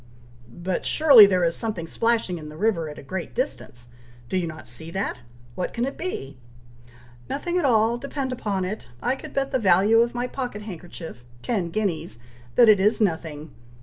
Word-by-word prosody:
"But 175 Hz, +7 st, -3 dB
surely 275 Hz, -10 st, +8 dB
there 185 Hz, -2 st, +2 dB
is 165 Hz, -1 st, +1 dB
something 215 Hz, -7 st, -3 dB
splashing 225 Hz, -1 st, 0 dB
in 150 Hz, -1 st, -9 dB
the 155 Hz, -, -11 dB
river 185 Hz, -6 st, 0 dB
at 150 Hz, -, -9 dB
a -, -, -10 dB
great 175 Hz, +6 st, -6 dB
distance. 125 Hz, -, -4 dB, 0.4 s
Do -, -, -2 dB
you 180 Hz, -2 st, 0 dB
not 155 Hz, -5 st, -9 dB
see 120 Hz, +8 st, -5 dB
that! 190 Hz, -6 st, -3 dB, 0.3 s
what 180 Hz, -, -4 dB
can 240 Hz, +1 st, 0 dB
it 275 Hz, -, -4 dB
be?" 140 Hz, -, -5 dB, 0.9 s
"Nothing 345 Hz, +5 st, -1 dB
at 330 Hz, -, 0 dB
all, 230 Hz, -1 st, +3 dB
depend 275 Hz, 0 st, -4 dB
upon 205 Hz, -7 st, -2 dB
it! 195 Hz, -, -5 dB
I 250 Hz, -, 0 dB
could -, -, -10 dB
bet 275 Hz, 0 st, -1 dB
the 260 Hz, -, +1 dB
value 200 Hz, +2 st, +4 dB
of 235 Hz, +1 st, +2 dB
my 245 Hz, +1 st, -1 dB
pocket 250 Hz, -5 st, -5 dB
handkerchief, 175 Hz, -, -9 dB, 0.2 s
ten 195 Hz, -8 st, -1 dB
guineas, 170 Hz, -, -2 dB, 0.4 s
that 240 Hz, -, +7 dB
it 210 Hz, -2 st, +7 dB
is 210 Hz, +3 st, +3 dB
nothing. 160 Hz, -6 st, -2 dB
200 Hz, 185 wpm, -24 LUFS, 165-240 Hz, 0.9 s, surely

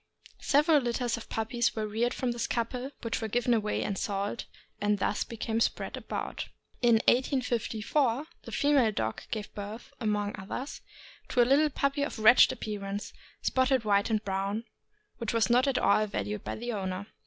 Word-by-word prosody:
Several 300 Hz, +2 st, +4 dB
litters 240 Hz, -1 st, -1 dB
of 230 Hz, -, -9 dB
puppies 230 Hz, +2 st, 0 dB
were 220 Hz, -1 st, -1 dB
reared 225 Hz, +3 st, 0 dB
from 250 Hz, -2 st, -1 dB
this 235 Hz, -1 st, -2 dB
couple, 245 Hz, +2 st, -2 dB
which 230 Hz, 0 st, -2 dB
were 220 Hz, -, -1 dB
given 240 Hz, +2 st, +1 dB
away 215 Hz, -2 st, 0 dB
and 200 Hz, -, -2 dB
sold, 200 Hz, +2 st, -2 dB, 0.4 s
and 205 Hz, 0 st, +2 dB
thus 205 Hz, -, 0 dB
became 225 Hz, -1 st, -3 dB
spread -, -, 0 dB
about. -, -, -4 dB, 0.3 s
In 240 Hz, -2 st, +5 dB
1854 250 Hz, +1 st, +1 dB, 0.2 s
the -, -, -10 dB
female 285 Hz, -6 st, +3 dB
dog 110 Hz, -, -2 dB
gave 215 Hz, -2 st, -4 dB
birth, 210 Hz, +3 st, -7 dB
among 210 Hz, -3 st, -1 dB
others, 235 Hz, +8 st, -6 dB, 0.5 s
to 245 Hz, -, +3 dB
a -, -, +2 dB
little 285 Hz, +4 st, +4 dB
puppy 280 Hz, 0 st, 0 dB
of 285 Hz, -, -2 dB
wretched 220 Hz, +3 st, +7 dB
appearance, 205 Hz, -1 st, -5 dB, 0.3 s
spotted 260 Hz, -2 st, +2 dB
white 200 Hz, 0 st, +3 dB
and 215 Hz, -1 st, 0 dB
brown, 195 Hz, +3 st, -1 dB, 0.6 s
which 230 Hz, -1 st, -2 dB
was 230 Hz, +1 st, +3 dB
not 250 Hz, +3 st, +4 dB
at 270 Hz, -2 st, +2 dB
all 215 Hz, -, +3 dB
valued 105 Hz, -, -3 dB
by -, -, -4 dB
the 240 Hz, +1 st, -4 dB
owner. 190 Hz, -1 st, -3 dB
230 Hz, 170 wpm, -29 LUFS, 210-250 Hz, 0.6 s, wretched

